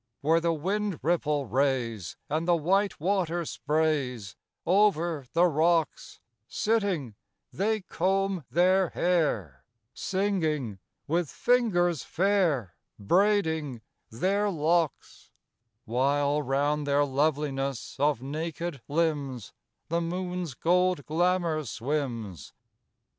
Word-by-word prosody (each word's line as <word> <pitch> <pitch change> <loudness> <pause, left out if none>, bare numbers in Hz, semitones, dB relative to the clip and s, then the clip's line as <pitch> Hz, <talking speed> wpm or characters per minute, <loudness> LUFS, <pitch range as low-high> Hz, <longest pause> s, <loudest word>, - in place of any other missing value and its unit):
Where 160 +3 +3
the 165 0 +1
wind 195 +4 -1
ripple 150 -3 +1
rays, 120 - -1
And 155 +3 -1
the 175 - +5
white 195 +5 +1
water 175 -1 0
sprays 145 -10 -1 0.3
Over 170 -7 +2
the 170 +2 +5
rocks, 165 0 +1 0.3
Sitting, 200 - 0 0.4
they 215 +2 0
comb 190 0 0
their 185 +2 +3
hair; 145 - 0 0.3
Singing, 160 - -1 0.3
with 165 0 0
fingers 180 - +2
fair 170 - +1 0.2
Braiding 160 - +1 0.3
their 195 - 0
locks; 165 -2 -1 0.6
While 140 +5 +1
round 145 +2 0
their 145 +1 +3
loveliness 140 -2 -1
of 145 -3 +1
naked 160 +1 -4
limbs 145 -7 -1 0.4
The 170 +1 0
moon's 180 -3 -3
gold 180 0 +1
glamour 170 -1 +1
swims. 115 - -4
160 Hz, 95 wpm, -28 LUFS, 140-180 Hz, 0.6 s, the